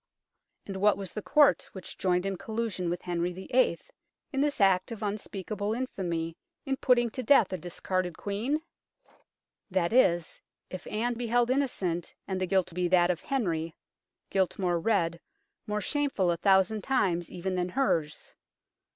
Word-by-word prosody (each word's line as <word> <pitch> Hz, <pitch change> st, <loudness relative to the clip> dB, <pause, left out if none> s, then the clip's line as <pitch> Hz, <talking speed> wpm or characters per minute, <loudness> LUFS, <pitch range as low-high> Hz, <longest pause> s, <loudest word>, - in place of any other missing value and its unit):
And 195 Hz, -1 st, -5 dB
what 205 Hz, 0 st, +4 dB
was 195 Hz, -3 st, -6 dB
the 210 Hz, -, -4 dB
Court 295 Hz, +3 st, +4 dB
which 190 Hz, -3 st, -8 dB
joined 180 Hz, 0 st, +1 dB
in 195 Hz, 0 st, -1 dB
collusion 215 Hz, -3 st, -3 dB
with 175 Hz, +1 st, -3 dB
Henry 175 Hz, 0 st, -1 dB
VIII. 190 Hz, +1 st, +1 dB, 0.6 s
in 270 Hz, -, +1 dB
this 290 Hz, 0 st, +1 dB
act 190 Hz, +1 st, +3 dB
of 220 Hz, -2 st, -6 dB
un 205 Hz, -1 st, 0 dB
158 195 Hz, -2 st, -7 dB
UNKNOWN 205 Hz, -1 st, -2 dB
LONDON 220 Hz, +2 st, 0 dB
speakable -, -, -3 dB, 0.3 s
infamy 165 Hz, 0 st, -3 dB, 0.3 s
in 270 Hz, -1 st, 0 dB
putting 240 Hz, -3 st, +3 dB
to 255 Hz, -, -4 dB
death 225 Hz, -6 st, +4 dB
a -, -, -1 dB
discarded 180 Hz, +1 st, -3 dB
Queen? 240 Hz, +10 st, -2 dB, 1.1 s
that 185 Hz, 0 st, 0 dB
is, 175 Hz, -9 st, +3 dB, 0.3 s
if 185 Hz, -, -7 dB
Anne 235 Hz, +3 st, -1 dB
be 240 Hz, 0 st, -4 dB
held 240 Hz, +1 st, +2 dB
innocent 190 Hz, -11 st, -1 dB
and 190 Hz, -1 st, -2 dB
the 185 Hz, -, 0 dB
guilt 185 Hz, -2 st, +1 dB
be 180 Hz, +1 st, 0 dB
that 175 Hz, 0 st, +4 dB
of 175 Hz, -, -4 dB
Henry, 170 Hz, -11 st, -2 dB, 0.6 s
guilt 190 Hz, -2 st, +1 dB
more 175 Hz, -3 st, +1 dB
red, 170 Hz, -4 st, +1 dB, 0.5 s
more 210 Hz, 0 st, -1 dB
shameful 275 Hz, -, +1 dB
a 170 Hz, -, -1 dB
thousand 195 Hz, +3 st, +3 dB
times 180 Hz, -10 st, +1 dB
even 185 Hz, +2 st, -4 dB
than 180 Hz, 0 st, -1 dB
hers. 165 Hz, -, -1 dB
190 Hz, 170 wpm, -29 LUFS, 175-230 Hz, 1.1 s, what